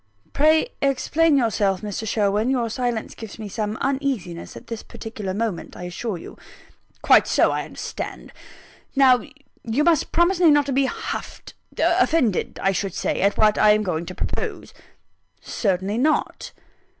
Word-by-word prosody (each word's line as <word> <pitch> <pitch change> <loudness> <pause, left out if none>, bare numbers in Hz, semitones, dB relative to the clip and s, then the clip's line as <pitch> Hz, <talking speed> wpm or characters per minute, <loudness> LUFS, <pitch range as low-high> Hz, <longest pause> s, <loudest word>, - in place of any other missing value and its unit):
"Pray 315 - +3
explain 285 +3 +2
yourself, 205 -6 +1
Mr. 210 +1 -5
Sherwin. 210 +2 +1
Your 240 -4 0
silence 240 -2 -2
gives 225 -3 -9
me 220 -2 -6
some 210 +1 -3
uneasiness 265 -11 -2
at - - -12
this 230 -1 -6
particular 215 -4 -7
moment, 205 -3 -3
I - - -8
assure 180 +3 -4
you." - - -11 0.6
"Quite - - +6
so - - +3
I - - -2
understand. - - -7 0.6
Now, 260 -3 +5 0.4
you 235 +6 0
must 330 -2 +2
promise 345 +2 +2
me 345 -3 +6
not 290 -1 +4
to 280 - -3
be 270 +1 +3
huffed - - -6 0.2
offended, 255 - +1
I 195 - +3
should 195 -1 -3
say - - -1
at 200 +1 +2
what 215 -1 +3
I 210 0 +6
am 215 0 +1
going 170 -3 -3
to 185 - -7
propose." - - -4 0.7
"Certainly 195 +1 -1
not." 305 +4 0
225 Hz, 155 wpm, -23 LUFS, 200-275 Hz, 0.7 s, Quite